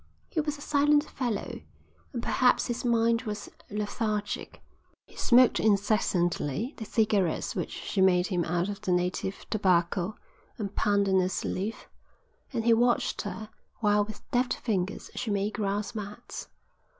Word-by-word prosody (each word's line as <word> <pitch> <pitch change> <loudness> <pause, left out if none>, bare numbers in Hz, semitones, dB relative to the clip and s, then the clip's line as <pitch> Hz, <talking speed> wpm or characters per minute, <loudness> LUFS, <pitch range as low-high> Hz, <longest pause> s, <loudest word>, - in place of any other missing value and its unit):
He 315 - +1
was 295 0 -3
a - - -13
silent 290 0 +3
fellow, 240 -7 -3 0.5
and 240 -3 -4
perhaps 250 -1 +3
his 240 -1 -3
mind 230 -1 +3
was 210 -4 -5 0.2
lethargic. 210 0 -3 0.4
He - - -20
smoked 250 0 +5
incessantly 200 - +1
the 220 - -6
cigarettes 205 -6 +1
which - - -2
she 195 - -2
made 180 -1 +5
him 180 -3 0
out 175 +2 0
of 205 0 -5
the 190 - -1
native 180 +2 -1
tobacco 185 -1 +2 0.4
and 205 -3 -4
pandanus 195 -3 +2
leaf, 205 +4 -3 0.6
and 230 -4 -2
he 235 - +6
watched 240 +1 +2
her 215 +1 -6 0.3
while 210 -1 +4
with 210 0 -10
deft 250 0 +2
fingers 195 -5 -2
she 235 - -3
made 205 +1 0
grass 205 -1 -2
mats. 210 -2 -7
210 Hz, 140 wpm, -28 LUFS, 190-230 Hz, 0.6 s, he